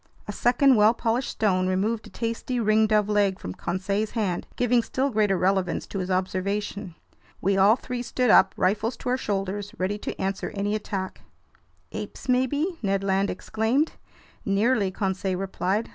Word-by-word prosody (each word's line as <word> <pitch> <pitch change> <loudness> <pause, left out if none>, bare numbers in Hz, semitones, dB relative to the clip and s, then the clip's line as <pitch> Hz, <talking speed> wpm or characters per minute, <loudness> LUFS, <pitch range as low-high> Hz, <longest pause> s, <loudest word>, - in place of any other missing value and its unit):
A - - -3
second 245 +4 +4
well 215 +3 +5
polished 235 +3 -1
stone 185 -4 +1
removed 210 +5 -1
a - - -13
tasty 230 +2 -3
ringdove 215 -1 +3
leg 205 -2 +2
from 90 - -6
Conseil's 195 - -2
hand, 190 -6 -1
giving 245 -1 +3
still 265 +4 -1
greater 210 -3 +2
relevance 185 -1 0
to 195 - -5
his 185 0 -3
observation. 190 0 -2 0.4
We 195 +1 +1
all 195 +3 +6
three 250 -1 -5
stood 245 -1 +1
up, 190 0 +5
rifles 215 +5 0
to - - -4
our 250 - +2
shoulders, 205 -1 -3
ready 195 +3 -1
to - - -6
answer 195 0 -2
any 205 +1 -1
attack. 195 -3 -4 0.7
"Apes - - -7
maybe?" 285 +8 +1
Ned 195 -2 0
Land 195 0 +1
exclaimed. 225 - 0 0.5
"Nearly," 205 +1 +2
Conseil 190 -1 -2
replied. 195 +2 -1
205 Hz, 160 wpm, -25 LUFS, 190-230 Hz, 0.7 s, all